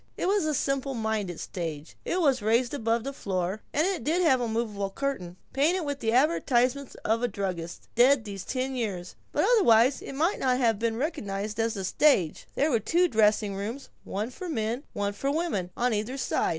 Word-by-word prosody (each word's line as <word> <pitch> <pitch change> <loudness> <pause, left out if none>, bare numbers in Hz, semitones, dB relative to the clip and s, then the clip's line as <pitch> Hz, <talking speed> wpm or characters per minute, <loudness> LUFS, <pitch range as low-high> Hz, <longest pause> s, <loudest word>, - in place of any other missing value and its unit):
It - - -1
was 395 -3 +2
a 305 -1 0
simple 275 0 -1
minded 220 -6 -2
stage. 160 -4 -5
It 365 - 0
was 270 -6 +3
raised 230 +4 +2
above 230 -4 0
the 275 +2 -4
floor, 190 -3 -2
and 305 +3 +2
it 380 -2 -1
did 340 +5 +1
have 265 -7 +4
a 240 - 0
movable 220 -3 -2
curtain, 195 -7 -4 0.2
painted 330 +7 +2
with 285 -2 -3
the 225 - 0
advertisement 260 -1 +2
of 225 +2 +2
a 245 - +2
druggist 185 -5 -5
dead 245 0 +5
these 195 -2 -6
ten 260 +2 -2
years, 195 -7 -3 0.2
but - - +2
otherwise 240 - +5
it - - -7
might 325 +8 +1
not 255 -1 +2
have 230 -5 +2
been 225 -1 0
recognized 210 - -3
as 225 -1 0
a 190 - -3
stage. 195 - +2
There 300 +2 +2
were 230 - +3
two 345 - +2
dressing 210 -3 +3
rooms, 225 +8 -5
one 215 +5 -3
for 365 +6 -7
men, 235 -1 -2
one 205 0 -1
for 275 +7 -2
women, 290 - -1
on 245 0 +1
either 215 +6 -2
side. 265 - 0
235 Hz, 200 wpm, -27 LUFS, 205-275 Hz, 0.2 s, dead